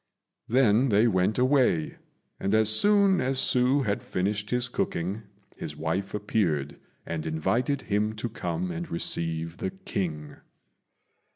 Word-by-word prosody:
Then 125 +1 +3
they 105 +2 +4
went 95 0 +1
away, 125 - +2 0.4
and 100 +2 0
as 110 -1 +4
soon 200 - +4
as 130 +1 0
Hsü 130 +2 +3
had 100 -1 -1
finished 100 +3 -2
his 125 0 0
cooking, 95 -3 -2 0.4
his 75 - -6
wife 85 +6 -2
appeared 90 -9 -1 0.3
and 80 -1 -4
invited 115 - 0
him 105 +1 0
to 110 +2 -3
come 90 -5 -3
and 85 0 -5
receive 85 0 -1
the - - -2
King. 95 - -5
105 Hz, 130 wpm, -27 LUFS, 85-125 Hz, 0.4 s, they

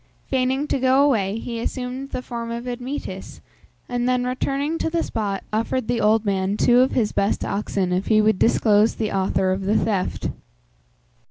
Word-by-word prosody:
Feigning 265 +2 0
to 280 - -1
go 260 +2 +4
away, 215 -8 +1
he 230 0 -5
assumed 255 +3 -4
the 255 - -4
form 235 -2 -5
of 235 +1 -5
Admetus, 250 +3 -6 0.5
and 245 0 -1
then 250 0 +1
returning 275 +5 -1
to - - 0
the 330 0 0
spot 200 -3 -3
offered 225 +2 -1
the 240 - 0
old 215 +1 +3
man 195 0 0
two 245 +2 +4
of 260 +1 +3
his 225 -4 +1
best 200 - 0
oxen 195 -2 -1
if 185 +2 -1
he 215 -1 +4
would 215 -2 +3
disclose 215 -1 +3
the 215 -2 -2
author 190 -1 +1
of 190 +1 -1
the 200 +3 +1
theft. 200 -4 -1
230 Hz, 180 wpm, -22 LUFS, 205-255 Hz, 0.5 s, go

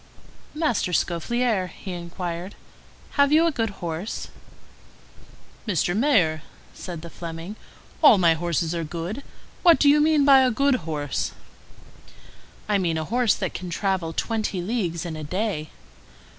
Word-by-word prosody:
"Master 270 - 0
Scaufflaire," 195 +4 0
he 185 +2 -9
inquired, 175 +1 -5 0.6
"have 280 0 +5
you 315 +2 +5
a 335 - +2
good 225 -6 -1 0.2
horse?" 170 +6 -4 1.4
"Mr. 175 -2 +1
Mayor," 200 - +2 0.3
said 170 -3 -7
the 170 - -7
Fleming, 170 +4 -7 0.5
"all 290 -9 +8
my 170 -3 +5
horses 165 0 -1
are 170 -1 -2
good. 170 - -5 0.4
What 340 -3 +7
do 290 - +3
you 295 +1 +6
mean 305 -2 +4
by 275 -1 +8
a 260 -1 +4
good 255 - +1
horse?" 145 -3 -2 1.3
"I 205 -1 +2
mean 170 -3 0
a 160 - -2
horse 240 +3 +1
which 190 -3 -2
can 180 0 -6
travel 185 -2 -1
twenty 215 +1 -2
leagues 180 -4 -2
in 165 -2 -4
a 155 - -6
day." 180 -1 -2
185 Hz, 145 wpm, -24 LUFS, 170-240 Hz, 1.4 s, all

